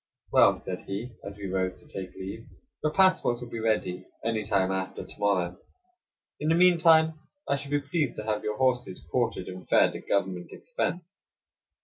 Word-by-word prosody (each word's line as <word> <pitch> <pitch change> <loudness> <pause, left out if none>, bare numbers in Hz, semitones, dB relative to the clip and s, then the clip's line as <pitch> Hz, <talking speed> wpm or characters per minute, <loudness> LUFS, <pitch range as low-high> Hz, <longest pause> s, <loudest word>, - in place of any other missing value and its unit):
"Well," - - +6
said 90 -1 -6
he, 105 +6 -4
as 100 0 -8
we 100 - -7
rose 95 -1 -1
to - - -14
take 95 -2 -7
leave, 100 +4 -7 0.4
"your 155 - +2
passports 185 -9 +4
will 120 -1 -8
be 115 - -4
ready 95 -5 -1 0.2
any 115 -2 0
time 95 -2 +1
after 95 0 -3
to - - -11
morrow; 90 -4 +1 0.8
in 150 - -1
the 165 - +4
mean 180 0 +5
time 160 -1 +5 0.3
I - - +2
shall 140 0 -5
be 145 0 +1
pleased 145 -1 -1
to 105 - -5
have 105 -1 -1
your 105 0 -2
horses 125 - 0
quartered 120 -6 0
and 90 0 -9
fed - - +4
at - - -9
government 95 -3 -1
expense." 475 - -3
110 Hz, 190 wpm, -28 LUFS, 95-145 Hz, 0.8 s, Well